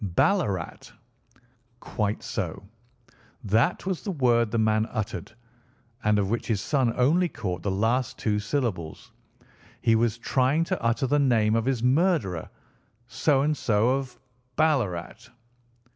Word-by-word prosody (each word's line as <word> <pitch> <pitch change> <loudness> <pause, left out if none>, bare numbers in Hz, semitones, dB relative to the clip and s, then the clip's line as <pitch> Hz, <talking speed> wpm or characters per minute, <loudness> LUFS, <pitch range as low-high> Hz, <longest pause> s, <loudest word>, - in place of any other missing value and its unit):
"BALLARAT." 105 - 0 0.9
"Quite 105 -3 -3
so. - - -4 0.8
That 110 - +1
was 190 -3 -2
the 210 - -5
word 120 - +2
the 115 - -2
man 110 0 +2
uttered, 110 0 -5 0.7
and 105 0 +3
of 100 -2 +1
which 115 - -2
his 110 -4 0
son 130 +1 +1
only 165 +8 +3
caught 90 - -4
the 100 - -2
last 115 +6 0
two 105 -2 0
syllables. 105 - -3 0.7
He 115 - +2
was 115 0 +1
trying 130 +6 +1
to - - -3
utter 115 +4 +1
the 145 +3 +2
name 115 -6 +3
of 115 0 0
his 130 -3 -1
murderer. 130 - +1 0.6
So 135 +3 +1
and 150 +1 +1
so, 115 -3 +1
of 130 -3 -6 0.4
Ballarat." 120 - 0
120 Hz, 135 wpm, -26 LUFS, 105-135 Hz, 0.9 s, and